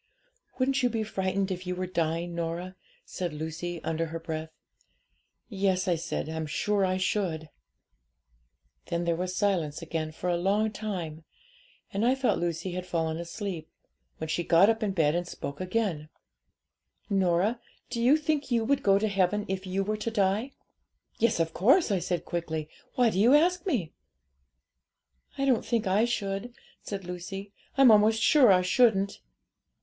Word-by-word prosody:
'"Wouldn't 270 +1 +1
you 250 - +3
be 225 -1 -1
frightened 195 -1 -1
if 180 0 -5
you 180 - -2
were 185 +1 -2
dying, 170 -1 -1
Norah?" 170 +2 -4 0.3
said 175 -4 -4
Lucy, 160 +3 -5
under 165 0 -1
her 165 +1 -5
breath. 160 -1 -5 1.0
'"Yes," 190 -3 0
I 180 - +3
said, 165 -2 -3
"I'm 160 0 -4
sure 200 +6 0
I 185 0 +1
should." 180 -5 -1 1.4
'Then 170 0 -1
there 170 -1 +1
was 180 +2 -3
silence 175 -7 0
again 160 -1 -3
for 160 - -5
a 175 -1 +2
long 205 +5 +1
time; 180 -7 -5 0.7
and 200 +2 0
I 250 +3 +4
thought 265 -1 +1
Lucy 170 +1 -2
had 180 +1 -5
fallen 160 -2 -1
asleep, 170 -1 -5 0.5
when 160 - -5
she 175 +2 -1
got 180 +5 +5
up 225 0 -4
in 205 -3 0
bed 155 -5 +2
and 175 +1 -1
spoke 140 -3 -6
again 185 -6 -1 1.0
'"Norah, 195 +3 +1 0.3
do 235 -1 -2
you 260 +6 +5
think 305 -2 -1
you 235 -2 +2
would 280 +3 +2
go 195 -4 +4
to 215 +2 +1
heaven 200 +1 +1
if 190 0 -4
you 190 +1 0
were 215 +2 -2
to 215 +2 -3
die?" 210 +3 +1 0.7
'"Yes, 230 -4 +2
of 165 -1 0
course," 265 - +4
I 195 - +2
said 175 0 -2
quickly; 160 -3 -3 0.3
"why 245 -3 +4
do 190 - -1
you 240 +7 +6
ask 360 +5 +2
me?" 225 - -1 1.4
'"I 275 - 0
don't 255 -4 +2
think 230 -2 0
I 195 +4 +3
should," 215 0 -3 0.3
said 195 -2 -6
Lucy; 195 +3 -7 0.2
"I'm 270 -3 +8
almost 220 +1 +4
sure 275 -8 +6
I 180 -1 +4
shouldn't." 200 0 +2
190 Hz, 165 wpm, -28 LUFS, 170-220 Hz, 1.4 s, I'm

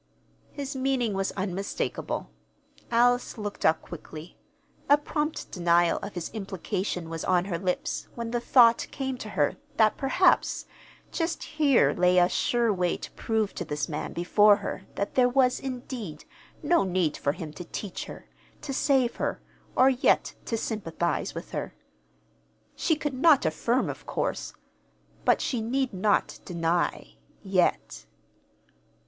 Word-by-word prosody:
His 280 -1 -5
meaning 260 -4 0
was 195 0 -1
unmistakable. 195 0 -3 0.6
Alice 245 +1 +2
looked 205 -1 -5
up 160 0 +3
quickly. 160 0 -10 0.5
A 290 - +8
prompt 300 +1 -3
denial 170 -1 +3
of 200 -1 -7
his 175 -2 -4
implication 190 -3 -3
was 165 0 -5
on 180 -1 +2
her 175 -4 -3
lips 180 -1 -2
when 235 -1 -4
the 240 - 0
thought 235 -1 +5
came 265 -1 -3
to 215 - -6
her 145 -7 0 0.2
that 215 -1 +4
perhaps 350 +7 +2 0.5
just 330 0 -2
here 295 -4 +3
lay 180 0 +3
a 175 0 +6
sure 235 +3 +1
way 180 -2 0
to - - -9
prove 220 -3 -1
to - - -4
this 150 0 -3
man 150 -2 -4
before 205 +4 +5
her 200 -1 -6
that 200 - -2
there 250 -1 +4
was, 255 0 +3
indeed, 245 - -6 0.4
no 345 - +3
need 180 -5 0
for 140 - -1
him 155 -1 -7
to 175 - -7
teach 190 +2 -6
her, - - -11 0.4
to 275 - -4
save 265 -3 +2
her, - - -2 0.4
or 260 +1 +6
yet 255 0 +2
to 230 - -1
sympathize 175 -7 -2
with - - -7
her. - - -4 1.0
She 320 - +1
could 295 -2 -3
not 280 - +5
affirm, 235 +11 +1
of - - -7
course; - - -2 0.7
but - - +4
she 245 -4 -1
need 260 +2 -1
not 200 +2 +1
deny 170 -1 -1 0.3
yet. 190 -3 0
210 Hz, 145 wpm, -27 LUFS, 180-255 Hz, 1.0 s, A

